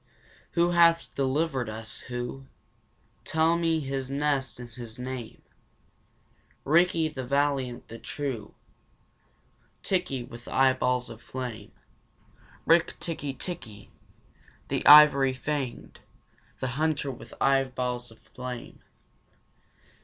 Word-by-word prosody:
Who 170 0 +3
hath 170 -1 +4
delivered 135 -2 0
us, 110 0 -5
who? 125 +2 -6 0.8
Tell 160 +1 +2
me 165 -2 +1
his 135 -2 -3
nest 140 -2 -1
and 125 - -7
his 115 -1 -8
name. 125 -2 -6 1.2
Rikki, 165 +1 +3
the 135 -4 -6
valiant, 140 -2 0
the 115 - -9
true, 130 -8 -5 1.3
Tikki, 180 -10 -1
with 120 0 -12
eyeballs 130 -2 +2
of 115 0 -11
flame, 120 -6 -6 0.9
Rik 165 0 +3
tikki 145 -5 -4
tikki, 110 - -7 0.8
the - - -1
ivory 145 -2 +9
fanged, 135 -2 -4 0.6
the 130 - -1
hunter 150 -3 0
with 125 - -11
eyeballs 125 -2 0
of 115 - -17
flame. 125 -1 -8
135 Hz, 100 wpm, -27 LUFS, 125-150 Hz, 1.3 s, ivory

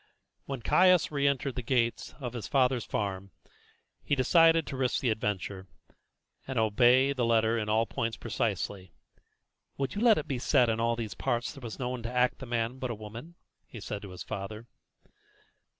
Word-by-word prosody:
When 135 -4 -5
Caius 180 +1 +4
re 140 -1 +1
entered 140 -1 0
the 125 - -4
gate 120 -1 -1
of 125 -4 -5
his 120 -3 -5
father's 130 -3 +2
farm 100 -2 -3 0.7
he - - -2
had - - -15
decided 165 +4 +5
to - - -6
risk 130 -1 0
the 125 - +1
adventure, 100 -3 -3 0.8
and 135 -2 -4
obey 120 +5 +4
the 130 -3 -1
letter 115 -1 +3
in 110 -2 -2
all 110 +2 +3
points 115 0 -3
precisely. 95 -4 -3 0.8
"Would 135 -1 -2
you 205 - -3
let 230 -3 +6
it 155 - -3
be 130 -3 -2
said 120 0 +3
that - - +2
in 110 - -4
all 115 +1 +1
these 115 -3 -5
parts 120 0 -2
there 135 - -12
was 115 -3 -7
no 125 -2 -3
one 125 -1 -4
to 115 +1 -5
act 125 0 +1
the 135 - -8
man 120 +2 -2
but 130 - -3
a 120 - -3
woman?" 115 +10 -10 0.3
he 115 - -10
said 105 0 -5
to 100 - -9
his 90 -1 -8
father. 105 +3 -6
120 Hz, 200 wpm, -29 LUFS, 110-135 Hz, 0.8 s, let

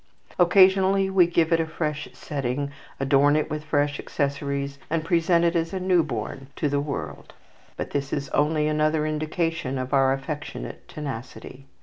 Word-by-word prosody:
Occasionally 190 +1 +5
we 185 -3 +5
give 170 -1 +2
it 165 - +4
a 165 - 0
fresh 150 -2 -3
setting, 140 0 -3 0.3
adorn 140 +2 +4
it 155 - 0
with 155 0 -3
fresh 145 -1 0
accessories, 140 0 -2
and 160 0 -1
present 170 0 +3
it 170 +1 +2
as 165 +1 0
new 185 -2 +3
born 135 -1 -5
to 150 - 0
the 145 0 0
world; 145 -1 -6 0.4
but - - -4
this 140 -1 -2
is 140 -1 -2
only 150 +1 +1
another 155 0 +1
indication 155 -2 -2
of 130 +2 -4
our 135 -1 +4
affectionate 145 +2 -5
tenacity. 135 -1 -8
150 Hz, 155 wpm, -25 LUFS, 140-165 Hz, 0.4 s, Occasionally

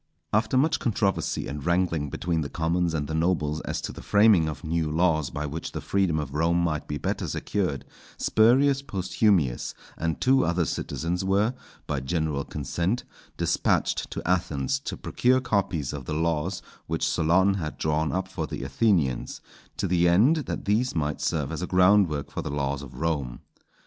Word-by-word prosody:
After 110 +4 +2
much 150 +5 +3
controversy 105 -4 0
and 75 0 -5
wrangling 85 -4 +1
between 85 +2 -1
the 70 - -3
commons 85 +2 0
and 75 -2 -1
the 80 - -4
nobles 80 -2 0
as - - -3
to - - -4
the - - -9
framing 100 -6 +4
of 80 - -7
new 80 -1 -1
laws 80 -3 +2
by 75 0 -4
which 75 +3 -5
the - - -3
freedom 95 -5 0
of 75 -3 -3
Rome 85 +3 +2
might 80 -3 -1
be 75 - -3
better - - -2
secured, 90 -10 -2 0.3
Spurius 135 +5 +4
Posthumius 95 - 0 0.2
and 80 -1 -1
two 130 +1 +4
other 85 0 +1
citizens 85 +4 -2
were, 100 +5 +2 0.3
by 75 - -2
general 75 0 -1
consent, 85 - -2 0.3
despatched - - +1
to - - -6
Athens 90 - 0
to 135 - -5
procure 130 +1 +2
copies 95 - -1
of 70 -3 -6
the 75 - -3
laws 80 +3 -1 0.2
which 80 +1 0
Solon 90 +4 +3
had 80 -6 -4
drawn 80 0 0
up 95 0 -2
for 90 -5 -4
the - - -5
Athenians, 70 - +1 0.4
to - - -1
the 85 0 +3
end 110 - +5
that - - -4
these 110 +4 +1
might 75 -2 -1
serve 75 -3 -1
as 80 - -4
a 90 - -2
groundwork 90 -6 +3
for - - -3
the - - -5
laws 70 -1 -2
of 70 -3 -10
Rome. 75 -7 -2
85 Hz, 175 wpm, -26 LUFS, 75-95 Hz, 0.4 s, end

